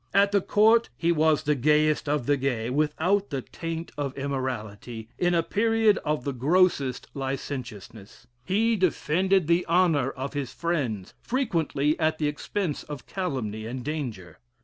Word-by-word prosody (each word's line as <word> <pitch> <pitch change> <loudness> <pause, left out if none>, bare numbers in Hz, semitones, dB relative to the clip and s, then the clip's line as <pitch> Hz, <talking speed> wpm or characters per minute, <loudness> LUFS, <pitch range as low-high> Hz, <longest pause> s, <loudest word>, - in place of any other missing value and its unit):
At 200 0 +5
the 200 -1 +3
Court 220 +4 +4
he 170 0 +2
was 155 -2 +3
the 150 -1 +2
gayest 150 +2 +2
of 145 -4 0
the 145 - +3
gay, 125 -4 -1
without 160 +8 +1
the 135 -3 -3
taint 165 0 -6
of 140 -2 -3
immorality, 120 -5 -4
in 175 0 +2
a 165 - +3
period 225 +2 +2
of 150 -4 -1
the 140 - -2
grossest 140 -1 +2
licentiousness; 125 -6 -6 0.2
he 225 +4 +2
defended 185 0 +2
the 170 +2 +3
honor 165 -6 +3
of 135 0 -5
his 140 -3 -3
friends, 130 - -2
frequently 165 - 0
at 155 -1 +1
the 150 - 0
expense 150 +2 -3
of 145 -4 -8
calumny 120 - -3
and 125 +1 -5
danger. 120 - -5
150 Hz, 150 wpm, -26 LUFS, 130-175 Hz, 0.2 s, At